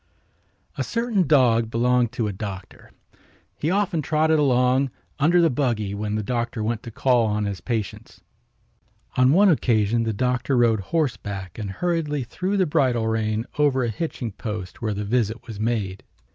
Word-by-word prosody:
A - - +1
certain 230 -7 0
dog 120 -6 +4
belonged 120 0 +2
to 115 - -1
a 105 - -3
doctor. 95 -2 -8 0.7
He 155 - 0
often 185 -4 +1
trotted 155 +1 +2
along 130 -1 +3 0.3
under 165 +5 +4
the 165 -3 +4
buggy 120 -7 -1
when 105 +1 -3
the 110 - -1
doctor 120 0 -2
went 115 +1 -1
to 115 - -8
call 125 -1 +2
on 105 0 -1
his 100 -2 -4
patients. 110 -5 -4 1.0
On 130 +1 +4
one 200 +6 +5
occasion 115 - +2
the 115 -1 0
doctor 125 +4 0
rode 115 -3 +3
horseback 100 - -3
and 105 -2 -4
hurriedly 150 - -1
threw 185 - -2
the 190 - +3
bridle 130 -8 +1
rein 110 0 -1
over 135 -3 +3
a 120 - 0
hitching 120 -1 -4
post 105 -3 -6
where 110 -3 -1
the 105 +1 -3
visit 115 +1 -1
was 110 -4 -8
made. 105 -4 -2
120 Hz, 165 wpm, -23 LUFS, 110-145 Hz, 1.0 s, one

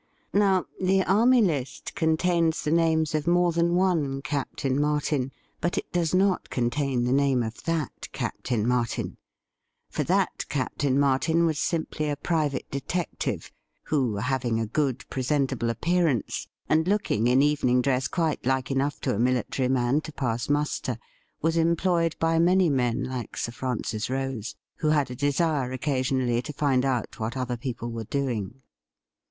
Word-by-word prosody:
Now, 195 -2 +3 0.2
the 190 +1 +3
Army 230 +6 +4
List 145 -9 -2
contains 165 0 +1
the 150 - 0
names 160 -2 +2
of 155 +1 -1
more 175 0 +4
than 170 +1 +2
one 160 -8 +1
Captain 140 -1 -1
Martin, 150 -3 0 0.3
but 175 - -1
it - - -3
does 175 -1 +1
not 190 0 +2
contain 125 +1 0
the 125 +1 +1
name 135 -3 +3
of 110 0 -6
that 165 -4 -2
Captain 115 -4 -2
Martin. 125 -2 -1 0.7
For - - -1
that - - +1
Captain 140 -1 0
Martin 145 +5 +3
was 155 -3 0
simply 160 -3 -1
a 145 - 0
private 150 -2 -1
detective, 150 +6 -3 0.3
who, 130 -8 0
having 120 0 0
a 115 - 0
good 130 +1 -1
presentable 135 -2 0
appearance, 160 - 0 0.2
and 160 +2 +2
looking 190 - +1
in 130 +3 +4
evening 140 -4 +3
dress 130 0 +1
quite 165 -4 -1
like 130 +1 0
enough 140 +2 0
to - - 0
a 100 - -2
military 125 +1 +1
man 130 +3 +2
to 155 - -8
pass 120 -4 -2
muster, 145 -4 0 0.5
was 165 +1 +2
employed 170 0 +2
by 165 0 +2
many 180 0 +4
men 125 -1 +1
like 125 -2 -5
Sir 115 - -2
Francis 120 -3 -3
Rose, 130 -4 -3 0.2
who 155 - -1
had 145 -4 +2
a - - -5
desire 145 -1 +1
occasionally 130 -3 0
to 150 - -7
find 135 -3 +1
out 125 -4 -2
what 115 +3 -3
other 125 -1 -2
people 120 -1 -5
were 115 -1 -4
doing. 125 -2 -3
140 Hz, 155 wpm, -26 LUFS, 125-165 Hz, 0.7 s, Army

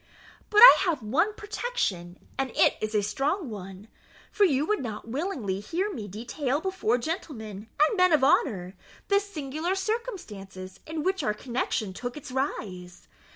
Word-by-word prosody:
But 420 0 +5
I - - +12
have 315 -9 0
one 335 - +1
protection, 410 - -3 0.2
and 270 -1 -1
it - - +4
is 215 0 -2
a 210 - +3
strong 275 - -1
one; 195 0 -9 0.4
for 410 - +4
you 290 -4 +2
would 425 +5 0
not 220 -3 -6
willingly 250 - -2
hear 360 - -2
me 215 - -6
detail 245 +7 -2
before 370 - 0
gentlemen, 225 - -5 0.2
and 425 - -3
men 365 -1 +5
of 305 -4 +4
honour, 195 -9 +2 0.3
the 400 0 +5
singular 335 -3 -3
circumstances 285 - -5
in 315 -1 -3
which 380 +2 0
our 210 - 0
connexion 235 -4 -2
took 245 +7 -6
its 280 - -9
rise. 185 -9 -4
265 Hz, 155 wpm, -27 LUFS, -, 0.4 s, I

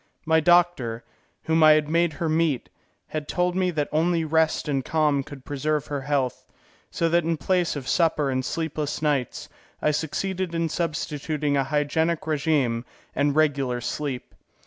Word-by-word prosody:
My 160 0 +4
doctor, 160 -9 +2 0.4
whom 160 0 +2
I 155 0 +8
had 150 -1 +2
made 165 +1 +2
her 165 +3 -3
meet, 155 -4 0 0.4
had 155 -1 -4
told 180 0 0
me 185 -1 +1
that 150 -4 -1
only 165 +1 +1
rest 160 0 +1
and 135 -3 0
calm 150 -1 +1
could 135 -1 -11
preserve 150 +1 -1
her 145 -1 -4
health, 135 -3 -1 0.4
so 165 - 0
that 170 0 +3
in 165 0 0
place 180 +1 0
of 135 -4 -6
supper 155 -1 +2
and 130 0 -1
sleepless 155 0 -3
nights, 140 -5 -1 0.3
I 150 - +2
succeeded 180 +4 -2
in 165 -1 0
substituting 150 -2 -2
a 135 -1 +1
hygienic 155 +3 0
regime 140 -6 +1 0.3
and 145 0 +1
regular 140 -5 +1
sleep. 130 +2 -4
155 Hz, 160 wpm, -25 LUFS, 140-165 Hz, 0.4 s, I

